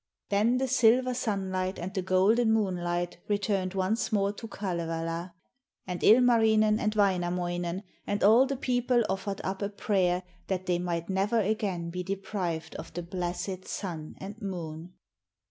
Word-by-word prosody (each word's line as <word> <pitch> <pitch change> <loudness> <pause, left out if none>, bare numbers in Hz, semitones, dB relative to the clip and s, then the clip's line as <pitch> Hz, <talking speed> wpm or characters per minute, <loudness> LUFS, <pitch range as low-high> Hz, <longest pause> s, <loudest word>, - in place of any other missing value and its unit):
Then 215 +5 +3
the 265 +1 0
silver 255 0 +4
sunlight 190 -5 -2
and 185 +3 -5
the 190 - -1
golden 200 +6 +3
moonlight 175 -5 0
returned 200 -2 0
once 195 +6 0
more 200 -1 +1
to 225 +2 -8
Kalevala, 170 -3 -3 0.5
and 180 -2 -4
Ilmarinen, 220 -2 +5
and 215 0 0
Wainamoinen, 175 -2 0 0.2
and 205 - -1
all 230 +6 +6
the 275 -1 -2
people 245 -1 +2
offered 195 +1 -3
up 190 +1 -3
a 200 - -1
prayer 185 -3 +1 0.2
that 185 -1 -2
they 175 -1 +1
might 170 -1 -2
never 195 +4 +1
again 195 -5 -1
be 180 +1 -3
deprived 185 -3 -3
of - - -8
the 175 - -3
blessed 180 +2 -4
Sun 165 -6 -5
and 205 +4 -8
Moon. 175 -3 -6
195 Hz, 145 wpm, -29 LUFS, 175-215 Hz, 0.5 s, all